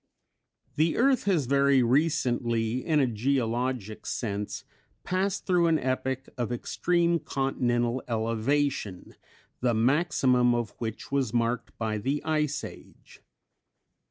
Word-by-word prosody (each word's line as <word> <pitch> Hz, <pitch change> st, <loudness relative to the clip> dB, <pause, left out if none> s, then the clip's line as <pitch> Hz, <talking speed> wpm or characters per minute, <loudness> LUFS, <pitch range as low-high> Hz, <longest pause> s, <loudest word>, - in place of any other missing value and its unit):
The 160 Hz, +2 st, +2 dB
earth 260 Hz, -1 st, +3 dB
has 180 Hz, -9 st, +2 dB
very 140 Hz, 0 st, +3 dB
recently, 120 Hz, -4 st, +1 dB
in 155 Hz, -2 st, +2 dB
a 135 Hz, -, +4 dB
geologic 120 Hz, -2 st, -1 dB
sense, 105 Hz, -3 st, -3 dB, 0.4 s
passed 190 Hz, +1 st, -1 dB
through 175 Hz, -2 st, +3 dB
an 165 Hz, -1 st, +3 dB
epoch 130 Hz, 0 st, -2 dB
of 120 Hz, -1 st, -1 dB
extreme 170 Hz, +7 st, +1 dB
continental 125 Hz, -3 st, -1 dB
elevation 115 Hz, -1 st, -1 dB, 0.5 s
the 120 Hz, -2 st, +1 dB
maximum 125 Hz, -1 st, +3 dB
of 120 Hz, -3 st, -2 dB
which 110 Hz, +1 st, -5 dB
was 130 Hz, -5 st, 0 dB
marked 120 Hz, +1 st, -1 dB
by 110 Hz, -2 st, -2 dB
the 135 Hz, +7 st, -2 dB
"Ice 150 Hz, -2 st, 0 dB
Age." -, -, -12 dB
130 Hz, 115 wpm, -27 LUFS, 115-150 Hz, 0.5 s, a